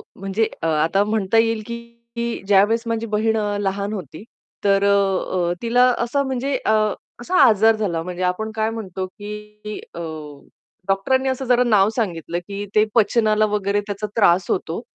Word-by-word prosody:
म्हणजे 195 +3 -1 0.2
आता 160 +5 +2
म्हणता 210 0 0
येईल 225 -1 +2
की 235 0 -6
ज्यावेळेस 205 +3 +4
माझी 230 0 -1
बहीण 220 +1 0
अ, 205 -1 -1
लहान 200 +1 -2
होती, 180 -3 -7 0.4
तर 200 -1 +3
अ, 195 -3 +1
अ, - - +1
तिला 245 +2 +4
असा 240 +4 0
म्हणजे 265 0 -1
अ, - - +3 0.5
असा 365 +9 -1
आजार 225 -1 +5
झाला 190 -7 -2
म्हणजे 180 +1 -5
आपण 185 +5 -1
काय 220 0 0
म्हणतो 195 -5 -5
की 210 +1 -9
अ, - - -7 0.9
डॉक्टरांनी 260 +8 +1
असं 260 0 -2
जरा 250 0 +4
नाव 210 -4 +4
सांगितलं, 175 -6 -2
की 200 0 -5
ते 215 0 +5
पचनाला 215 -1 +3
वगैरे 205 -1 0
त्याचा 205 +1 -4
त्रास 185 -5 +3
होतो, 175 +1 -2
210 Hz, 155 wpm, -21 LUFS, 195-230 Hz, 0.9 s, आजार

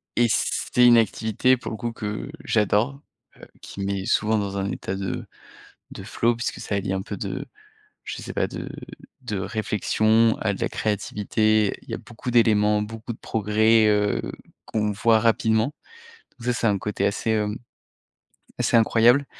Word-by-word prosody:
et 120 - +4
c'est 125 +2 +2
une 120 -1 +8
activité 115 +3 +2
pour 120 - -7
le 110 - -5
coup 120 -1 -3
que 105 +4 -5
j'adore, 115 +4 +1 0.4
heu, - - -13 0.2
qui 100 - -8
me - - -2
met 100 -1 -2
souvent 110 0 +2
dans 100 -1 -3
un 100 0 -2
état 95 - -4
de 95 -1 -4 0.7
de - - -8
flow 120 0 0
puisque 120 - -3
ça 100 - -3
allie 95 -1 -1
un 95 - -1
peu 100 -1 -6
de 100 0 -4 0.6
je - - -6
sais - - -7
pas - - +1
de - - -7 0.5
de 105 -5 -3
réflexion 110 +2 +1
à 100 - 0
de - - -7
la - - 0
créativité. 105 0 0
Il - - -21
y - - -2
a - - -2
beaucoup 120 +1 -7
d'éléments, 105 -3 +3
beaucoup 115 +2 -6
de - - -18
progrès, 110 +1 +3
heu, 105 -1 +2 0.5
qu'on 105 -1 -1
voit 110 +2 +3
rapidement, 110 +3 +2 0.7
donc 115 - -11
ça, 125 - +2
c'est 120 - -1
un 100 -2 +3
côté 100 0 -2
assez, 105 +2 -1
hem, 105 -1 0 1.0
assez - - +2
incroyable 120 +5 +4
110 Hz, 175 wpm, -24 LUFS, 105-115 Hz, 1.0 s, une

